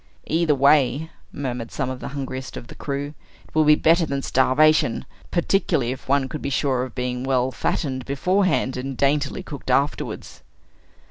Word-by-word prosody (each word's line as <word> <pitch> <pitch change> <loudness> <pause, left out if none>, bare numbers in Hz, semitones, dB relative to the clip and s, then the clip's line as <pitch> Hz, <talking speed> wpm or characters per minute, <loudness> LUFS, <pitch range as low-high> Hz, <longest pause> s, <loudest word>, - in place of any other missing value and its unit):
"Either 160 -2 +2
way," 140 +2 +3 0.2
murmured 125 -4 -4
some 135 - -2
of 130 - -6
the - - -6
hungriest 135 -1 -5
of - - -8
the - - -11
crew; 145 +1 -4 0.3
"it - - -24
will 155 - +4
be 150 0 +6
better 165 +3 +4
than 140 -3 -2
starvation; 130 0 +3 0.2
particularly 170 -8 +1
if 130 - -8
one 140 -1 +2
could 150 +2 -6
be - - -2
sure 135 -2 +1
of 125 -2 -5
being 125 0 -2
well 130 -1 +1
fattened 130 +1 -2
beforehand, 180 -1 +1
and 130 0 -4
daintily 140 +1 +1
cooked 140 -3 -8
afterwards." 140 +3 -1
140 Hz, 165 wpm, -23 LUFS, 130-150 Hz, 0.3 s, be